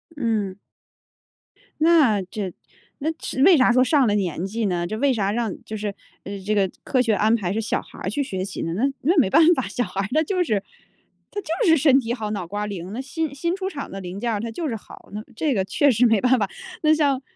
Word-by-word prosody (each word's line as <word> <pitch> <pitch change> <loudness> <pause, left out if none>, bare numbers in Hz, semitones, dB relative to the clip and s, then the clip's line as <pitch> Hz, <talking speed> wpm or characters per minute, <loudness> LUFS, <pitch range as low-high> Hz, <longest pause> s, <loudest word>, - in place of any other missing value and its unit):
嗯。 220 -8 -1 1.2
那 305 -11 +5
这 190 +1 -5 0.5
那 310 +3 0
这 260 - -4
为 370 +1 +8
啥 255 -2 +5
说 255 +1 +5
上 275 -1 +3
了 205 - +2
年 180 -4 -1
纪 220 +3 -2
呢？ 175 -3 -1
这 215 - -4
为 275 +3 +2
啥 205 -4 0
让 225 -3 -1
就 215 - -6
是 205 -1 -3 0.5
这 215 +1 +1
个 195 -2 +2
科 260 - 0
学 230 -3 +2
安 215 +2 +3
排 190 -5 -2
是 220 - -1
小 220 - -1
孩 - - -15
儿 - - -3
去 285 +8 -1
学 190 -8 -4
习 195 - -5
呢？ 165 - -2
那 205 +8 -1 0.2
那 340 +7 +2
没 240 - +3
办 325 - +6
法， 260 - -2
小 245 +5 -1
孩 195 - -3
儿 195 - -2
他 310 +1 +3
就 365 +2 0
是 210 - -1 0.7
他 415 - -4
就 365 +5 -1
是 325 - +6
身 270 -2 +5
体 235 -2 -2
好、 215 -4 -4
脑 190 -5 -4
瓜 205 +4 -3
灵。 190 -3 -6
那 240 - -4
新 280 +3 -3
新 340 +5 -1
出 380 0 -3
厂 280 -7 -7
的 195 - -6
零 180 +1 -6
件 235 +1 -1
儿 210 - -1
它 230 +2 -4
就 320 +8 -3
是 240 - -2
好， 215 - -13
那 210 +1 -5
这 295 +3 0
个 195 -5 +1
确 285 +8 +3
实 245 +1 +4
没 225 -2 +3
办 255 +3 +3
法。 200 -2 0 0.3
那 310 0 +5
像 285 -4 +2
225 Hz, 265 characters per minute, -23 LUFS, 200-285 Hz, 1.2 s, 为